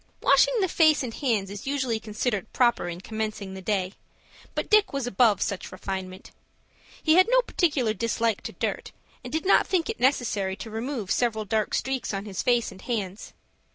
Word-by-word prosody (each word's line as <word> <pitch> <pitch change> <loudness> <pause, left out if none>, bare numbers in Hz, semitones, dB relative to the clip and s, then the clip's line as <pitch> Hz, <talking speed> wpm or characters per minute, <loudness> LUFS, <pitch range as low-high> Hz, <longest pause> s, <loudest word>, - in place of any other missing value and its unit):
Washing - - +4
the 380 - +2
face 315 -4 +4
and 235 -3 -5
hands 220 -8 -1
is 200 +5 -8
usually 260 -5 0
considered 215 -1 -3
proper 240 -7 +2
in 175 +1 -6
commencing 215 -2 -4
the 190 - -8
day, 190 -1 -1 0.6
but - - -2
Dick 425 -1 +4
was 275 -3 -2
above 225 -3 +3
such 200 - -4
refinement. 185 0 -6 0.7
He 315 - +4
had 370 - +6
no - - +4
particular 290 - +1
dislike 230 -1 0
to - - -5
dirt, - - -3 0.3
and - - -7
did 315 +2 -2
not 390 - +4
think 370 +2 +1
it 450 - -10
necessary 220 -8 +1
to 220 +2 -8
remove 225 -2 -4
several 220 -3 0
dark 215 +1 0
streaks 265 -6 -2
on 195 +1 -4
his 195 -4 -4
face 240 -2 +1
and 190 0 -13
hands. 205 -5 -4
225 Hz, 185 wpm, -26 LUFS, 200-270 Hz, 0.7 s, had